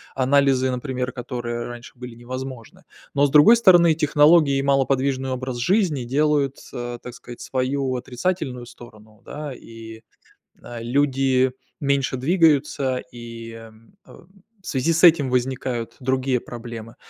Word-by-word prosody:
анализы, 135 -1 +2
например, 125 0 -3
которые 120 -1 -5
раньше, 120 0 -9
были 125 -1 -9
невозможны. 130 0 -8 0.3
Но, 140 0 +3
с - - +1
другой 150 +12 +7
стороны, 175 -6 +6
технологии 150 -1 +4
и - - 0
малоподвижный 135 -1 0
образ 130 -1 -4
жизни 165 - +1
делают, 140 +1 +1 0.2
э, 120 0 -5
так 125 - -9
сказать, 120 0 -12
свою 130 0 -2
отрицательную 125 0 -3
сторону, 110 -3 -16
да, 150 0 -7
и, 115 -2 -12 0.6
э, 120 -1 -8
люди 130 0 +1 0.3
меньше 140 -2 0
двигаются 140 -3 +2 0.2
и, 115 -1 -9
э, - - -10
м, 110 - -20 0.7
в - - -17
связи 140 +4 0
с 165 - +2
этим 160 -5 +6
возникают 125 -2 -2
другие 130 -1 0
проблемы. 115 -1 -9
130 Hz, 135 wpm, -22 LUFS, 120-140 Hz, 0.7 s, другой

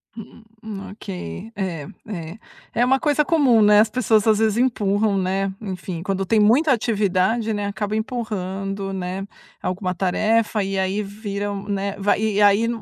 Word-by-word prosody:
Hum 225 0 -12 0.5
ok. 90 - -7
É, 170 -7 -4 0.2
é, 170 -2 -6 0.4
é 245 - +2
uma 265 +1 +3
coisa 300 0 +2
comum, 275 -9 +4
né, 210 0 +6
as 215 +1 +4
pessoas 220 -3 +2
às 215 -1 +5
vezes 220 -1 +1
empurram, 210 -4 +1
né, 190 +1 0
enfim, 185 -4 -5
quando 195 0 -1
tem 215 +4 +2
muita 255 +9 +4
atividade, 215 -1 +1
né, 205 -1 -2
acaba 210 +1 -3
empurrando, 195 -4 -3
né, 190 +1 -4 0.4
alguma 185 0 -2
tarefa 215 +3 +1
e 195 0 -2
aí 190 +2 0
viram, 200 0 -5
né 200 0 -2
Vai 205 +1 +1
e 210 -1 +1
aí 205 +3 +5
205 Hz, 155 wpm, -22 LUFS, 195-220 Hz, 0.5 s, né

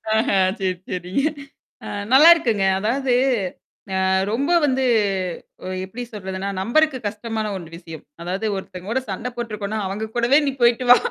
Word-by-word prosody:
ஆஹா! 220 -3 +2 0.2
சரி, 185 -1 0 0.2
சரிங்க. 180 +7 -2 0.6
அ - - -6 0.2
நல்லாருக்குங்க. 265 - +6
அதாவது, 250 +4 0 0.9
அ - - +2 0.2
ரொம்ப 270 +8 0
வந்து 265 -2 +1 1.0
எப்டி 225 +6 -7
சொல்றதுன்னா, 190 -1 -5
நம்பருக்கு 270 +6 +2
கஷ்டமான 220 +1 -4
ஒண்ண 170 -3 -8
விஷயம். 165 -2 -10 0.2
அதாவது 190 +5 -3
ஒருத்தங்கோட 190 +6 -4
சண்ட 230 +6 -3
போட்ருக்கோனா, 215 -3 -4
அவங்க 215 +3 -4
கூடவே 240 +5 +4
நீ 275 - +2
போயி்டு 240 +1 +3
வா 245 - +11
220 Hz, 130 wpm, -22 LUFS, 190-250 Hz, 1.0 s, வா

